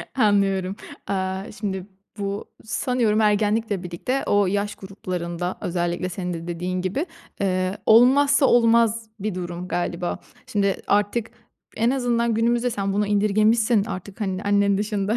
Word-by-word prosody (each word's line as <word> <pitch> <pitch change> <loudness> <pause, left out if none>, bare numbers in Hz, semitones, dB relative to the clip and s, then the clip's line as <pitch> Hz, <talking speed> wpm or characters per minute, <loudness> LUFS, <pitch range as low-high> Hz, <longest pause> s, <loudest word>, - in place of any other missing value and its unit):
Anlıyorum. 195 -4 +2 0.3
Aaa, 190 0 -2
şimdi 195 -2 -4 0.3
bu, 200 0 -3 0.2
sanıyorum, 220 -1 +1
ergenlikle 210 -1 +1
birlikte 180 +10 -2
o 205 -1 +3
yaş 205 +2 -1
gruplarında 180 -2 -4
özellikle 175 +1 -1
senin 180 0 -4
de 165 0 -6
dediğin 180 +1 -2
gibi, 195 - -1 0.4
eee, 185 0 0
olmazsa 275 +5 +6
olmaz 230 -2 +3
bir 205 -1 -3
durum 175 0 -5
galiba. 175 0 -2 0.3
Şimdi 200 -2 0
artık 205 +3 +1 0.5
en 230 +2 +3
azından 240 -3 +1
günümüzde 235 +2 +2
sen 200 -4 -2
bunu 210 0 +1
indirgemişsin 215 +2 +3
artık, 195 +2 -7
hani, 190 -1 -2
annen 200 -1 +3
dışında 205 0 -1
205 Hz, 130 wpm, -23 LUFS, 185-225 Hz, 0.5 s, olmazsa